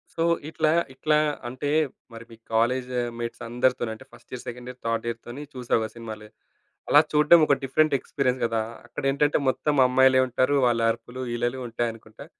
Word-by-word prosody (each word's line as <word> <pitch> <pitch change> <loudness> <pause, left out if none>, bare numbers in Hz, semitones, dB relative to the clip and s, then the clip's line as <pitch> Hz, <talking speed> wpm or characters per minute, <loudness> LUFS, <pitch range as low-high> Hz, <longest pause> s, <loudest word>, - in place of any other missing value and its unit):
So, 165 - -1 0.3
ఇట్లా, 155 -1 +1 0.2
ఇట్లా 150 +3 +1 0.3
అంటే, 130 +3 -4 0.4
మరి 115 0 -10
మీ 115 - -12 0.2
కాలేజా 125 +2 +1 0.2
మేట్సందరితోనూ 120 0 -1
అంటే, 130 +4 -15
first - - -18
year, 125 - -6
second 125 +1 -7
year, 125 0 -9
third 115 0 -1
ఇయర్‌తోని 120 +4 -6
చూసావా 120 -3 0
సినిమాలే. 110 -2 -9 0.6
అలా - - +8
చూడ్డం 150 +3 +6
ఒక 140 - +3
డిఫరెంట్ 155 +3 +2
ఎక్స్‌పీరియన్స్ 130 -2 -1
గదా! 115 -1 0 0.3
అక్కడెంటంటే 140 +3 +1
మొత్తం 150 +3 0
అమ్మాయిలే 130 +1 +5
ఉంటారు, 130 +3 +1
వాళ్ళ 115 -1 +1
అరుపులు, 120 +3 -8
ఈలలు 120 +2 -2
ఉంటాయనుకుంటా. 115 -1 -5
125 Hz, 150 wpm, -25 LUFS, 115-135 Hz, 0.6 s, అలా